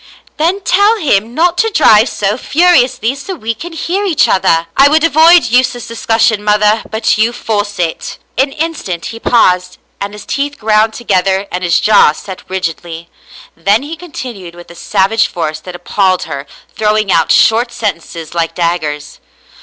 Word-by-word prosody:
" - - -32
Then 345 +6 0
tell 405 +4 +2
him 235 - 0
not 350 +2 +1
to 450 - +2
drive 230 - +4
so 205 +1 -1
furiously, 260 -5 +2
so 280 +8 -7
we 230 -7 -4
can 335 +11 -9
hear 355 +5 -2
each 365 -7 +2
other." 165 -3 +2
*' - - -43
I 275 +1 +5
would 310 +1 +2
avoid 330 +2 +5
useless 245 0 0
discussion, 225 -2 0
mother, 210 +1 +2
but 220 0 0
you 225 +2 +2
force 205 -3 -3
it." 170 -2 -3 0.2
An 270 +2 +1
instant 300 - -4
he 225 - -9
paused, 180 -7 +1 0.2
and 200 +1 -5
his 210 - -10
teeth 285 +1 -3
ground 215 0 +1
together 195 -3 0
and 180 +1 -4
his 175 -1 +2
jaw 210 -8 +4
set 190 +3 -9
rigidly, 170 -2 -5 0.4
then 200 +9 +1
he 310 +3 -6
continued 245 - -9
with 175 0 -13
a - - -13
savage 200 +4 +1
force 155 -3 -4
that 180 -1 -10
appalled 185 0 0
her, 140 -3 -7 0.3
throwing 215 -2 0
out 165 - +2
short 235 +2 +3
sen 210 -7 -2
tences 165 -1 -10
like 165 -1 -2
daggers. 155 -4 -3
215 Hz, 175 wpm, -13 LUFS, 180-275 Hz, 0.4 s, I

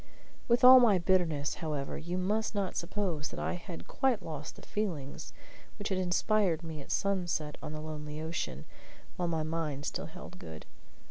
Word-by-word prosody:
With 240 +1 +3
all 255 +1 +12
my 225 -6 +6
bitterness, 170 -5 +2
however, 150 -4 -2
you 175 +3 -3
must 210 +4 0
not 195 -3 -1
suppose 170 -4 -2
that - - -7
I - - -1
had 175 -1 -7
quite 260 -5 +1
lost 155 -1 -6
the - - -13
feelings 170 -11 -3 0.5
which 205 0 -3
had 190 -1 0
inspired 180 -1 +2
me 160 -2 -6
at - - -12
sunset 175 -6 0
on - - -5
the 155 0 -5
lonely 150 -1 -5
ocean, 155 - -3 0.5
while 175 - -1
my 160 -2 0
mind 155 -3 -2
still - - -3
held - - -10
good. 80 -1 -9
170 Hz, 175 wpm, -32 LUFS, 150-195 Hz, 0.5 s, all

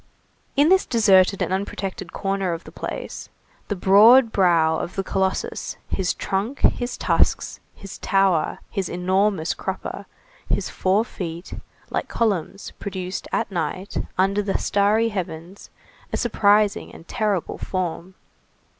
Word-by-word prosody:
In 290 +3 +4
this 380 +1 +4
deserted 195 -4 +4
and - - -2
unprotected 190 -1 -4
corner 195 -2 -1
of 165 - -6
the - - -12
place, - - -6 0.4
the 205 - -2
broad 220 +6 +6
brow 165 -5 +3
of 180 - -5
the 195 - -1
colossus, 190 0 -2
his 190 -2 -1
trunk, 210 +8 -3
his 245 0 +1
tusks, - - +1 0.2
his 195 - -10
tower, 195 -5 +2
his 195 -3 -2
enormous 185 -1 +1
crupper, - - -5 0.4
his - - -1
four 195 +4 +1
feet, 170 -4 -7 0.4
like - - -2
columns 200 -4 -1
produced, 190 -1 -5
at - - -1
night, 185 +2 -3 0.2
under 195 +2 +2
the 200 -1 -1
starry 210 +3 +2
heavens, 180 -2 -6 0.4
a - - -1
surprising 210 -3 +2
and 165 - -14
terrible 210 -6 -1
form. 185 0 -4
195 Hz, 130 wpm, -23 LUFS, 180-205 Hz, 0.4 s, broad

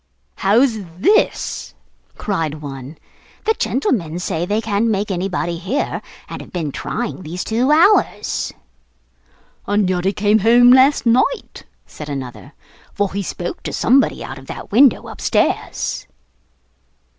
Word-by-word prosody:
'How's 225 +3 +3 0.2
this?' 410 - +1 0.4
cried 165 -7 -2
one. 140 -1 -8 0.5
'The 445 - +3
gentleman 175 - -1
say 175 -1 -2
they 210 +3 +1
can't 215 0 0
make 205 -2 -1
anybody 175 -2 -2
hear, 205 +11 -2 0.3
and - - -7
have - - -13
been 165 -5 -3
trying 230 - -4
these 175 +2 -5
two 235 +4 0
hours.' 345 +7 +3 1.2
'And 205 -1 +2
yet 180 -1 -1
he 195 - +3
came 210 +1 +2
home 240 +3 +6
last 265 +2 +5
night,' 255 - +1 0.2
said 150 -1 -9
another; 135 0 -7 0.4
'for 200 -2 -1
he 200 - -2
spoke 175 -2 -5
to - - -5
somebody 270 +3 +2
out - - -7
of - - -15
that - - -8
window 255 +3 +4
upstairs. - - -1
205 Hz, 135 wpm, -19 LUFS, 175-240 Hz, 1.2 s, home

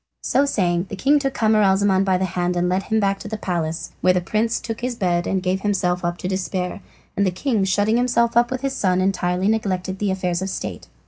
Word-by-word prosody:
So 280 - +2
saying 180 -8 0
the - - -5
king 285 +8 +3
took 270 -1 -2
Camaralzaman 200 -3 +3
by 190 -1 +2
the 190 - 0
hand 180 -1 -1
and 175 +1 +1
led 185 +2 +1
him 220 +3 0
back 195 -1 +1
to - - -8
the 220 +1 -4
palace, 170 -5 -3
where 185 - +4
the 180 - +2
prince 215 +6 0
took 225 -1 -5
to 240 - -3
his 250 - -4
bed 175 -5 0
and 190 -1 -1
gave 185 +1 0
himself 180 -3 0
up 175 0 -1
to 180 - -4
despair, 185 0 -3 0.3
and 200 - +1
the 190 - +3
king 205 +3 -1
shutting 205 +4 +2
himself 235 -1 +2
up 240 0 +4
with 255 -1 -3
his 275 -1 -1
son 185 -2 +1
entirely 185 -1 0
neglected 190 -3 -1
the 205 - 0
affairs 185 -2 -1
of 190 - -2
state. - - -5
195 Hz, 240 wpm, -22 LUFS, 180-220 Hz, 0.3 s, where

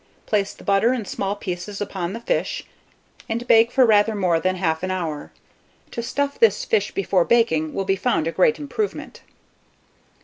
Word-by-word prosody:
Place 205 -2 -1
the - - -15
butter, 200 +5 +3
in 235 -5 -3
small 195 +1 -3
pieces, 190 +1 -6
upon 190 -3 -4
the 230 - -5
fish, - - -2 0.6
and 235 +2 -2
bake 230 +1 +5
for 260 - +5
rather 215 0 +3
more 180 -5 +1
than 185 +2 0
1/2 160 -3 -1
an 185 - -3
hour. 165 -6 -4 0.6
To 235 - -4
stuff 280 +4 -2
this 485 +2 +3
fish 450 -3 +1
before 195 - +1
baking, 160 -9 +1
will 195 - -1
be 195 0 +2
found 195 -5 0
a 165 - -1
great 190 +6 +3
improvement. 405 +8 -4
205 Hz, 175 wpm, -22 LUFS, 185-235 Hz, 0.6 s, bake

